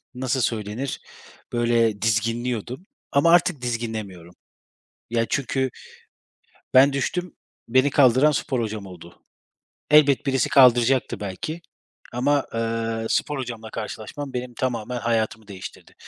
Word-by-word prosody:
nasıl 130 Hz, 0 st, -1 dB
söylenir, 115 Hz, +3 st, -2 dB, 0.5 s
böyle, 115 Hz, -3 st, +1 dB
dizginliyordum 115 Hz, -, -1 dB, 0.3 s
ama 145 Hz, +4 st, +4 dB
artık 165 Hz, -5 st, +3 dB
dizginlemiyorum. 110 Hz, -8 st, -5 dB, 0.8 s
Ya, 115 Hz, -1 st, +1 dB
çünkü 135 Hz, -1 st, -1 dB, 1.0 s
ben 135 Hz, +2 st, +6 dB
düştüm, 175 Hz, +6 st, -2 dB, 0.3 s
beni 130 Hz, +4 st, +3 dB
kaldıran 135 Hz, +1 st, +5 dB
spor 130 Hz, -1 st, -1 dB
hocam 110 Hz, -2 st, -4 dB
oldu. 85 Hz, -2 st, -13 dB, 0.7 s
Elbet 150 Hz, -2 st, +5 dB
birisi 135 Hz, -3 st, +1 dB
kaldıracaktı 125 Hz, -1 st, +4 dB
belki 105 Hz, -, -5 dB, 0.5 s
ama, 140 Hz, +3 st, +1 dB
ııı, 115 Hz, 0 st, -2 dB
spor 150 Hz, -, 0 dB
hocamla 115 Hz, -3 st, -6 dB
karşılaşmam 135 Hz, +6 st, -6 dB
benim 125 Hz, 0 st, -4 dB
tamamen 120 Hz, -1 st, -3 dB
hayatımı 110 Hz, -2 st, -1 dB
değiştirdi 95 Hz, -2 st, -10 dB
120 Hz, 110 wpm, -23 LUFS, 110-135 Hz, 1.0 s, ben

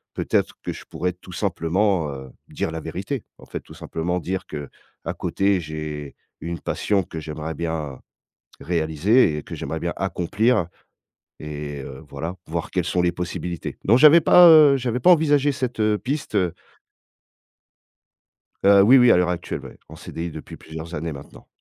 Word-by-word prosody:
peut-être -, -, 0 dB
que -, -, -3 dB
je -, -, -11 dB
pourrais 90 Hz, +3 st, -3 dB
tout 90 Hz, +1 st, -15 dB
simplement, 90 Hz, -2 st, 0 dB
heu, 65 Hz, -2 st, -9 dB, 0.2 s
dire -, -, -3 dB
la 80 Hz, -, -4 dB
vérité, 95 Hz, -, -5 dB, 0.2 s
en -, -, -14 dB
fait -, -, -6 dB
tout -, -, -15 dB
simplement 85 Hz, +2 st, -3 dB
dire 95 Hz, +2 st, -4 dB
qu'à 75 Hz, -2 st, -8 dB
côté 100 Hz, -1 st, +1 dB
j'ai 75 Hz, -2 st, -6 dB, 0.3 s
une 85 Hz, 0 st, -4 dB
passion 100 Hz, +5 st, 0 dB
que 80 Hz, -, -7 dB
j'aimerais 80 Hz, +1 st, -5 dB
bien 80 Hz, -4 st, -4 dB, 0.6 s
réaliser 80 Hz, -, +2 dB
et -, -, -6 dB
que -, -, -8 dB
j'aimerais 80 Hz, +4 st, -4 dB
bien 85 Hz, 0 st, -2 dB
accomplir 95 Hz, +3 st, +1 dB, 0.7 s
et 75 Hz, -2 st, -6 dB
heu, 65 Hz, +2 st, -9 dB
voilà, 80 Hz, +6 st, -5 dB
voir 85 Hz, +1 st, -4 dB
quelles 90 Hz, -3 st, -1 dB
sont 90 Hz, 0 st, 0 dB
les 90 Hz, 0 st, +2 dB
possibilités. 90 Hz, 0 st, -5 dB
Non, 115 Hz, +5 st, +5 dB
j'avais 155 Hz, +4 st, +8 dB
pas, 175 Hz, +2 st, +8 dB
heu, 150 Hz, -4 st, +8 dB
j'avais 125 Hz, -1 st, -2 dB
pas 180 Hz, -, +4 dB
envisagé 145 Hz, -4 st, +4 dB
cette, 125 Hz, -3 st, -4 dB
heu, 105 Hz, -1 st, +2 dB
piste, 140 Hz, -2 st, -4 dB
heu 90 Hz, -4 st, +1 dB, 2.1 s
Heu, 100 Hz, 0 st, +7 dB
oui, 125 Hz, +7 st, +7 dB
oui, 125 Hz, -1 st, +6 dB
à -, -, +7 dB
l'heure 90 Hz, 0 st, +2 dB
actuelle, 90 Hz, -1 st, -4 dB
ouais, -, -, -12 dB
en -, -, -11 dB
CDI 85 Hz, +1 st, -6 dB
depuis 80 Hz, -1 st, -9 dB
plusieurs 80 Hz, +1 st, -9 dB
années 80 Hz, +1 st, -3 dB
maintenant. 70 Hz, 0 st, -12 dB
90 Hz, 170 wpm, -23 LUFS, 80-105 Hz, 2.1 s, j'avais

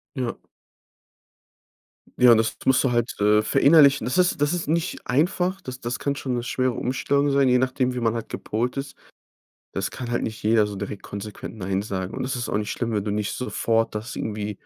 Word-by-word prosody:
Ja. 125 Hz, -3 st, -2 dB, 1.8 s
Ja, 125 Hz, -2 st, +8 dB
das 110 Hz, 0 st, +1 dB
musst 130 Hz, +1 st, +4 dB
du 125 Hz, -, +2 dB
halt, 120 Hz, 0 st, -1 dB
äh, 105 Hz, +1 st, +4 dB
verinnerlichen. 140 Hz, +1 st, +5 dB
Das 125 Hz, +8 st, -1 dB
ist 180 Hz, -4 st, +2 dB
das 145 Hz, +2 st, +2 dB
ist 175 Hz, -4 st, -2 dB
nicht 170 Hz, +3 st, -1 dB
einfach. 180 Hz, +7 st, +1 dB
Das 130 Hz, 0 st, -7 dB
das 120 Hz, +2 st, -3 dB
kann 140 Hz, -, -1 dB
schon 130 Hz, -2 st, -3 dB
'ne 120 Hz, -, -1 dB
schwere 130 Hz, +1 st, 0 dB
Umstellung 140 Hz, +4 st, 0 dB
sein, 140 Hz, -1 st, +3 dB
je 125 Hz, 0 st, +4 dB
nachdem, 130 Hz, 0 st, 0 dB
wie 125 Hz, -, -3 dB
man 115 Hz, -1 st, +1 dB
halt 115 Hz, -1 st, -5 dB
gepolt 120 Hz, +5 st, -3 dB
ist. 135 Hz, 0 st, -5 dB, 0.8 s
Das -, -, -2 dB
kann 120 Hz, -2 st, -6 dB
halt 120 Hz, -, 0 dB
nicht 110 Hz, 0 st, -5 dB
jeder, 110 Hz, 0 st, +3 dB
so 105 Hz, -, -6 dB
direkt 100 Hz, +1 st, -6 dB
konsequent 100 Hz, +2 st, -7 dB
nein 95 Hz, -2 st, -2 dB
sagen. 95 Hz, -3 st, -4 dB
Und -, -, -3 dB
das 130 Hz, 0 st, -2 dB
ist 120 Hz, 0 st, -3 dB
auch 100 Hz, -, 0 dB
nicht 105 Hz, -1 st, -3 dB
schlimm, 115 Hz, -1 st, -2 dB
wenn 105 Hz, -1 st, -1 dB
du 105 Hz, -, -1 dB
nicht 105 Hz, -1 st, -2 dB
sofort 115 Hz, -3 st, 0 dB
das 110 Hz, +4 st, -5 dB
irgendwie 105 Hz, -1 st, -3 dB
120 Hz, 210 wpm, -24 LUFS, 110-135 Hz, 1.8 s, Ja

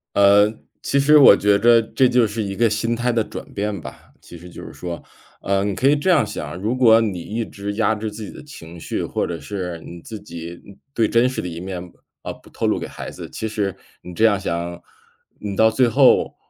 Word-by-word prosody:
呃， 100 Hz, +1 st, +6 dB, 0.4 s
其 140 Hz, -, +1 dB
实 150 Hz, +2 st, +6 dB
我 140 Hz, -8 st, +9 dB
觉 100 Hz, 0 st, +3 dB
得 115 Hz, +2 st, +5 dB
这 130 Hz, +3 st, +1 dB
就 125 Hz, -2 st, +3 dB
是 110 Hz, +1 st, -3 dB
一 100 Hz, -1 st, -4 dB
个 115 Hz, +2 st, +2 dB
心 115 Hz, +3 st, -1 dB
态 120 Hz, +1 st, 0 dB
的 115 Hz, -1 st, +1 dB
转 -, -, -8 dB
变 105 Hz, -1 st, -3 dB
吧， -, -, -12 dB
其 85 Hz, -, -12 dB
实 90 Hz, -, -13 dB
就 90 Hz, -, -11 dB
是 -, -, -9 dB
说 85 Hz, -1 st, -7 dB, 0.4 s
呃 100 Hz, 0 st, 0 dB
你 100 Hz, -, -1 dB
可 130 Hz, +8 st, +2 dB
以 145 Hz, -, +4 dB
这 150 Hz, +5 st, -4 dB
样 -, -, +4 dB
想， 85 Hz, -6 st, -6 dB
如 110 Hz, +4 st, -1 dB
果 115 Hz, -3 st, +6 dB
你 100 Hz, -5 st, -2 dB
一 110 Hz, +7 st, -4 dB
直 100 Hz, -1 st, -6 dB
压 110 Hz, +1 st, +1 dB
制 110 Hz, 0 st, -5 dB
自 110 Hz, +1 st, -8 dB
己 105 Hz, -, -7 dB
的 -, -, -12 dB
情 85 Hz, -, -12 dB
绪， -, -, -4 dB
或 -, -, -2 dB
者 85 Hz, -1 st, -5 dB
是 90 Hz, +1 st, -5 dB
你 85 Hz, +1 st, -10 dB
自 110 Hz, +3 st, -9 dB
己， 85 Hz, -3 st, -9 dB
嗯 100 Hz, 0 st, -14 dB, 0.2 s
最 115 Hz, -4 st, +1 dB
真 115 Hz, +2 st, +3 dB
实 130 Hz, -, -3 dB
的 -, -, -5 dB
一 85 Hz, -1 st, -6 dB
面 90 Hz, -1 st, -7 dB, 0.3 s
呃 -, -, -5 dB
不 -, -, -14 dB
透 -, -, -2 dB
露 -, -, +1 dB
给 -, -, -5 dB
孩 -, -, -8 dB
子， -, -, -9 dB
其 110 Hz, -, -4 dB
实 105 Hz, -3 st, -2 dB, 0.3 s
你 90 Hz, -, -10 dB
这 110 Hz, +6 st, +2 dB
样 105 Hz, -3 st, +3 dB
想， 85 Hz, -2 st, -4 dB, 0.6 s
你 100 Hz, -1 st, -5 dB
到 110 Hz, +2 st, +4 dB
最 120 Hz, +2 st, +3 dB
后， 115 Hz, -, +4 dB
105 Hz, 260 characters per minute, -21 LUFS, 90-115 Hz, 0.6 s, 我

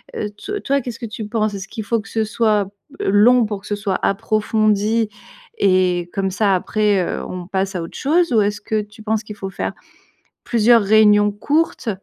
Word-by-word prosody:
heu, 210 Hz, -, -3 dB, 0.2 s
to 415 Hz, 0 st, -3 dB
toi, 275 Hz, 0 st, 0 dB
qu'est-ce 235 Hz, -1 st, -7 dB
que 235 Hz, -, -5 dB
tu 215 Hz, 0 st, -6 dB
penses? 215 Hz, -1 st, -1 dB
Est-ce 195 Hz, -1 st, -6 dB
qu'il 220 Hz, -3 st, -6 dB
faut 230 Hz, -1 st, +1 dB
que 225 Hz, -, -14 dB
ce 220 Hz, -1 st, 0 dB
soit, 215 Hz, -2 st, +1 dB, 0.3 s
heu, -, -, 0 dB
long 235 Hz, +3 st, +5 dB
pour 205 Hz, -2 st, -5 dB
que -, -, -13 dB
ce 205 Hz, -, -1 dB
soit 205 Hz, -2 st, -2 dB
approfondi 215 Hz, +2 st, +1 dB, 0.5 s
et 180 Hz, -2 st, +2 dB
comme 195 Hz, -1 st, -1 dB
ça, 200 Hz, 0 st, +2 dB
après, 205 Hz, +2 st, +1 dB
heu, -, -, -4 dB
on 180 Hz, -1 st, -7 dB
passe 195 Hz, 0 st, -2 dB
à 175 Hz, -, -2 dB
autre 165 Hz, -, -8 dB
chose 325 Hz, 0 st, +1 dB
ou 220 Hz, -, +5 dB
est-ce 205 Hz, 0 st, -1 dB
que 215 Hz, 0 st, -1 dB
tu 210 Hz, +1 st, -13 dB
penses 220 Hz, 0 st, -1 dB
qu'il 210 Hz, -1 st, -9 dB
faut 195 Hz, -1 st, -5 dB
faire -, -, -3 dB, 0.7 s
plusieurs 230 Hz, -1 st, +4 dB
réunions 210 Hz, 0 st, +5 dB
courtes? 290 Hz, +4 st, -1 dB
210 Hz, 205 wpm, -19 LUFS, 200-225 Hz, 0.7 s, long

